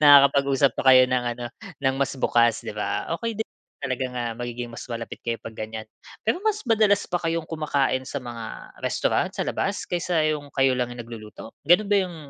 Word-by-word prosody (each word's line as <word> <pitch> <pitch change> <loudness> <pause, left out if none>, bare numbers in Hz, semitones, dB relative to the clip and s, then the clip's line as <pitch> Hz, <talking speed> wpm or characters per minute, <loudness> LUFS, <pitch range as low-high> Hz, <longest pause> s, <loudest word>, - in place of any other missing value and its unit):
nakakapag-usap 140 -2 +6
pa - - -3
kayo 130 - +8
ng 125 -1 +2
ano, 120 - -6 0.4
ng 135 0 +3
mas 140 0 0
bukas, 120 -2 +3
'di - - -4
ba. 105 +6 -2
Okey 230 -2 -2
din 220 - -1 0.4
talaga 130 -1 -1
nga 120 - -1
magiging 120 0 -5
mas - - -8
malapit 115 -1 -5
kayo 115 -1 -2
'pag 115 - -6
ganyan. 110 0 -6 0.4
Pero 225 +11 +1
mas 425 -2 0
madalas 215 -4 +3
ba 175 - -2
kayong 165 -1 -1
kumakain 145 -5 0
sa - - -5
mga 120 -4 -7
restaurant, - - +1
sa - - 0
labas - - -1
kaysa 175 -2 0
yung 150 -2 -1
kayo 135 -1 +4
lang 125 -1 0
yung 120 -1 -7
nagluluto, 110 -1 -10 0.2
gano'n 175 +5 +6
ba - - +6
yung, 180 -3 -4
135 Hz, 195 wpm, -25 LUFS, 120-165 Hz, 0.4 s, kayo